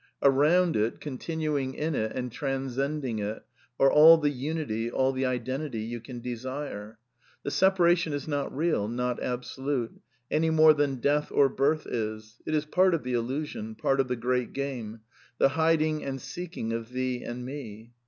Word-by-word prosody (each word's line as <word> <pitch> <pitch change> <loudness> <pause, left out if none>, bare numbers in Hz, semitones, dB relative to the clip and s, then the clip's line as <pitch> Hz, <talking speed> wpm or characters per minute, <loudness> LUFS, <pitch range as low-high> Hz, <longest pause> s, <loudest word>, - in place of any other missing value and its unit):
Around 155 +6 +4
it, 110 +2 0
continuing 145 -1 -3
in 155 +1 -1
it 110 -5 -1
and 125 -1 -3
transcending 135 -1 -2
it, 105 +1 -4 0.4
are 135 - +6
all 160 +2 +9
the 150 -2 +1
unity, 135 -5 -2
all 130 +2 +1
the 130 0 -1
identity 130 0 -3
you 120 +2 -4
can 120 +1 -8
desire. 120 -3 -5 0.5
The 140 - -3
separation 175 -3 +3
is 145 +1 -4
not 145 -2 -2
real; 155 -8 0
not 125 +1 -2
absolute; 125 0 -3 0.3
any 160 +1 +2
more 160 -1 +7
than 145 -2 +1
death 145 +3 +1
or 140 -1 +4
birth 145 +4 +1
is; 110 0 -5
it 155 - 0
is 150 0 0
part 185 +3 +3
of 155 - -4
the 125 0 -3
illusion; 120 -2 -3
part 135 +5 +1
of 135 - +2
the 125 - -1
great 125 +1 -1
game; 120 -6 -4 0.2
" 120 - -29
the - - +5
hid 160 +2 +2
and 150 -4 -2
seeking 170 -7 -5
of 115 0 -4
thee 125 -1 -2
and 125 +1 -5
me." 120 -5 -8
135 Hz, 175 wpm, -28 LUFS, 120-150 Hz, 0.5 s, all